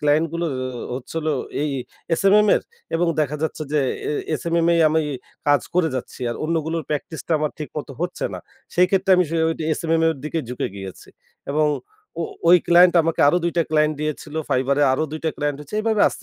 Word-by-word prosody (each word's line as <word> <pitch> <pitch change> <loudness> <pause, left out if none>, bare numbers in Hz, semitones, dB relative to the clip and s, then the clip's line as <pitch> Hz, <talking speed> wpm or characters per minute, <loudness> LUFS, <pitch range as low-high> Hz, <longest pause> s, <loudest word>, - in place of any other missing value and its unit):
Client 150 +2 +3
গুলো 170 0 -1 0.5
ও - - -2
হচ্ছিল 160 +5 -5 0.4
এই 150 - 0 0.5
SMM 210 +2 +5
এর - - +1 0.3
এবং 175 +1 +2
দেখা 150 0 0
যাচ্ছে 160 0 -2
যে 150 - +3 0.3
এ - - 0 0.3
SMMএ 170 0 +2
আমি 160 +1 +2 0.5
কাজ 145 0 +5
করে 175 -2 +3
যাচ্ছি। 130 - -6
আর - - -4
অন্যগুলোর 165 0 -1
প্র্যাকটিসটা 155 +2 -3
আমার 150 -1 0
ঠিক 150 - -5
মতো 145 - -7
হচ্ছে 175 +1 -3
না। - - -5 0.4
সেই 180 +1 +5
ক্ষেত্রে 195 0 +1
আমি 180 - +4
সে 165 - -1
ওই - - +1 0.3
SMM 165 0 +1
এর 165 - +3
দিকে 155 +2 -2
ঝুঁকে 125 - -2
গিয়েছি। 95 -1 -9 0.4
এবং 155 +1 +3 0.5
ও - - +1 0.3
ওই 180 - +9
ক্লায়েন্ট 175 +1 +6
আমাকে 165 0 -1
আরো 150 - +3
২ 170 - 0
টা 170 - +4
ক্লায়েন্ট 155 0 +3
দিয়েছিল 155 0 -4 0.2
Fiverrএ, 135 +2 +2
আরো 130 - +1
২ 155 - -5
টা 160 - +2
ক্লায়েন্ট 145 -1 -2
হচ্ছে 150 +6 -9
এইভাবে 220 -1 +1
আস্তে, - - -10
160 Hz, 195 wpm, -22 LUFS, 150-170 Hz, 0.5 s, ওই